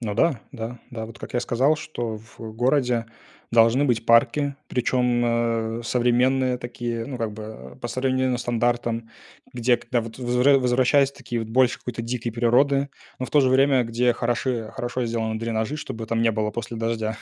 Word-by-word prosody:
Ну 105 -4 -3
да, 145 +3 +2
да, 115 +2 -6
да. 110 -2 -5
Вот 115 - -12
как - - -9
я 120 - +2
сказал, 130 +5 +2
что 120 -8 -5
в 110 0 -11
городе 125 -1 +1 0.4
должны 115 +4 +4
быть 120 -4 0
парки, 130 +5 +3
причем, 125 -1 +1 0.6
э, - - -8
современные 125 +2 +2
такие, 120 -1 -4
ну 135 - -5
как 115 -2 -2
бы 105 -12 -9
по 120 - -3
современным 130 +1 0
стандартам, 120 -1 -1 0.4
где 120 0 +2
когда 120 0 -1
вот 115 0 -8
возвра 125 +3 +3
возвращаясь 130 +2 +3
такие 125 -4 -5
вот 110 - -5
больше 125 +2 +3
какой-то 125 -1 -5
дикий 120 0 -3
природы, 135 +4 +2 0.3
но 130 - -3
в - - -12
то 150 - +5
же 130 - +3
время 135 0 +4
где 120 +1 +1
хороши 120 -1 -1
хорошо 125 -1 -3
сделаны 115 -1 -2
дренажи, 115 +4 -2
чтобы 115 -7 -6
там 115 -1 0
не 115 - +4
было 105 -1 -1
после 120 0 -5
дождя 110 -1 -2
120 Hz, 180 wpm, -24 LUFS, 115-130 Hz, 0.6 s, то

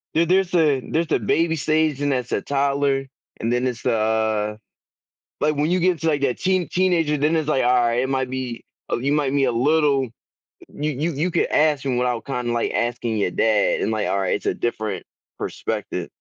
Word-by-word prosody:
there 165 +1 +4
there's 185 0 +2
a 150 -6 +3
there's 165 0 -1
a - - +3
baby 165 +9 +1
stage 155 -1 +1
and 145 -1 +1
there's 125 -2 -2
a - - 0
toddler, 140 -1 0 0.3
and 115 +2 -1
then 125 +1 +1
it's 120 -2 -4
the, 120 -3 +2
uh 110 -1 0 0.8
like, 150 0 +2
when 150 +4 0
you 185 - +2
get 180 +1 +3
into 160 -1 -7
like 145 -3 +1
that 130 -3 0
teen 185 -2 +1
teenager, 170 -5 +1
then 150 +3 +1
it's 155 -2 0
like, 135 -4 +2
alright 120 -1 +3
it 130 - -1
might 130 -1 -1
be 130 -2 -5 0.3
oh, - - 0
you 140 +3 0
might 145 -3 +1
be 140 -1 +3
a 125 - +1
little 140 +1 +2 0.6
you 150 +1 -3
you 155 +6 -2
you 165 +6 0
could 170 - +1
ask 150 -2 +2
him 130 -2 0
without 125 -2 -1
kinda, 125 -3 -2
like, 120 - -1
asking 120 -1 -1
your 95 - +1
dad. 105 0 +2
And, - - 0
like, 110 -1 -1
uh, 100 - 0
it's 95 - -1
a - - +1
different 110 -4 -3 0.3
perspective. - - -4
135 Hz, 210 wpm, -22 LUFS, 120-155 Hz, 0.8 s, there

